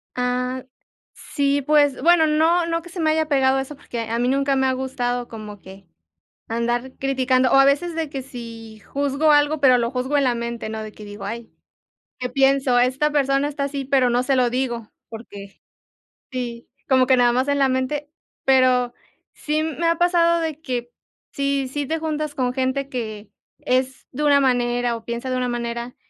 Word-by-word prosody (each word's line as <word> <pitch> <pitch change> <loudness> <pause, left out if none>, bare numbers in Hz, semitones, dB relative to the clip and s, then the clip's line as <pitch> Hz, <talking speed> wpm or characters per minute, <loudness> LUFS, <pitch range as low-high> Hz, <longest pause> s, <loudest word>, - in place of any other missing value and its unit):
Ah, 250 +1 -2 0.5
sí, 280 -1 -1
pues 290 -1 +3
bueno, 330 +1 +5
no 325 +3 +3
no 335 0 -1
que 350 - -13
se 355 +1 -8
me 315 -1 +2
haya 315 0 +1
pegado 270 -2 +3
eso, 270 +2 -5
porque 240 -4 -7
a 230 +1 -2
mí 245 - +1
nunca 275 +1 +1
me 265 0 +2
ha 260 - +1
gustado 245 -2 -2
como 215 -2 -8
que 190 0 -14 0.6
andar 240 +3 -1
criticando. 260 -1 +1
O - - +3
a 270 - +7
veces 290 +5 +1
de 320 -2 -3
que 275 - -4
si 230 -4 -10
juzgo 285 +5 +1
algo, 295 +1 +3
pero 255 -3 +6
lo 235 -1 0
juzgo 260 +3 -1
en 280 - +2
la 250 -2 +2
mente, 235 -1 -4
¿no? 220 0 -5
De 215 0 -8
que 210 - -12
digo: 205 -1 -9
"Ay, 230 +3 -6 0.7
que 250 - -2
pienso, 270 -1 +3
esta 260 +5 +2
persona 275 -1 +1
está 285 -1 -3
así", 280 -1 -3
pero 265 -2 +2
no 245 +1 +2
se 270 +1 +1
lo 250 -1 +3
digo, 240 -3 -3 0.2
porque 205 -3 -11 0.7
sí, 240 -3 -5 0.2
como 260 -1 +4
que 260 - +5
nada 245 -1 +4
más 255 +3 0
en 285 0 +1
la 270 -1 +3
mente. 260 +3 -2 0.3
Pero, 255 -2 +3 0.4
sí 305 +1 -1
me 320 +1 -1
ha 335 0 +2
pasado 340 -1 +3
de 315 -2 -3
que, 245 -5 -4 0.4
si 275 -2 -1
si 290 +2 -3
te 320 +4 -2
juntas 305 -2 -3
con 250 -2 0
gente 265 +1 -1
que 215 -5 -6 0.3
es 260 +1 -1
de 295 +4 -4
una 285 -1 +5
manera 245 -2 +1
o 225 - -15
piensa 235 +2 -4
de 255 - -1
una 250 0 -1
manera, 235 0 -4
260 Hz, 195 wpm, -22 LUFS, 240-285 Hz, 0.7 s, a